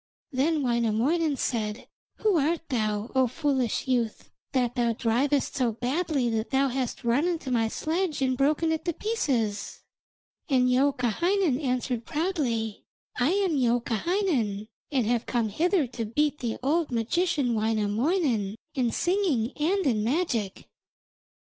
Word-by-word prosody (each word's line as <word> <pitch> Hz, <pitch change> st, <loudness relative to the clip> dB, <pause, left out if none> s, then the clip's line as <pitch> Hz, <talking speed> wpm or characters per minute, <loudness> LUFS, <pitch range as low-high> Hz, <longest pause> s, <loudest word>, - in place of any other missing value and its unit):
Then 295 Hz, +3 st, +1 dB
Wainamoinen 245 Hz, +6 st, +1 dB
said: 220 Hz, -3 st, -2 dB, 0.3 s
'Who 425 Hz, -5 st, +2 dB
art 325 Hz, +3 st, -1 dB
thou, 215 Hz, -3 st, -1 dB
O 260 Hz, -1 st, +3 dB
foolish 265 Hz, -3 st, -1 dB
youth, 240 Hz, -4 st, -1 dB, 0.2 s
that 250 Hz, -3 st, +1 dB
thou 240 Hz, -2 st, +1 dB
drivest 255 Hz, +6 st, +1 dB
so 245 Hz, -4 st, +1 dB
badly 270 Hz, +3 st, -1 dB
that 220 Hz, 0 st, -1 dB
thou 270 Hz, 0 st, +2 dB
hast 255 Hz, 0 st, -3 dB
run 245 Hz, +8 st, +2 dB
into 330 Hz, -7 st, -2 dB
my 230 Hz, -2 st, +2 dB
sledge 320 Hz, +6 st, -1 dB
and 260 Hz, -1 st, +1 dB
broken 300 Hz, +5 st, +2 dB
it 320 Hz, 0 st, -1 dB
to 340 Hz, -, 0 dB
pieces?' 245 Hz, -, -2 dB, 0.7 s
And 250 Hz, -2 st, +3 dB
Youkahainen 280 Hz, -, +2 dB
answered 250 Hz, -3 st, -1 dB
proudly: 270 Hz, -, -1 dB, 0.4 s
'I 245 Hz, +4 st, +3 dB
am 385 Hz, -4 st, +1 dB
Youkahainen, 240 Hz, -, 0 dB, 0.2 s
and 260 Hz, -5 st, +1 dB
have 235 Hz, +1 st, 0 dB
come 235 Hz, -3 st, 0 dB
hither 335 Hz, -, +2 dB
to 235 Hz, -2 st, -5 dB
beat 295 Hz, +7 st, 0 dB
the 235 Hz, -2 st, -3 dB
old 315 Hz, +4 st, +1 dB
magician 250 Hz, +3 st, +1 dB
Wainamoinen 220 Hz, -, 0 dB, 0.2 s
in 250 Hz, -4 st, 0 dB
singing 345 Hz, -, +1 dB
and 360 Hz, +6 st, 0 dB
in 220 Hz, -6 st, +2 dB
magic.' 235 Hz, -, -1 dB
255 Hz, 135 wpm, -27 LUFS, 230-315 Hz, 0.7 s, O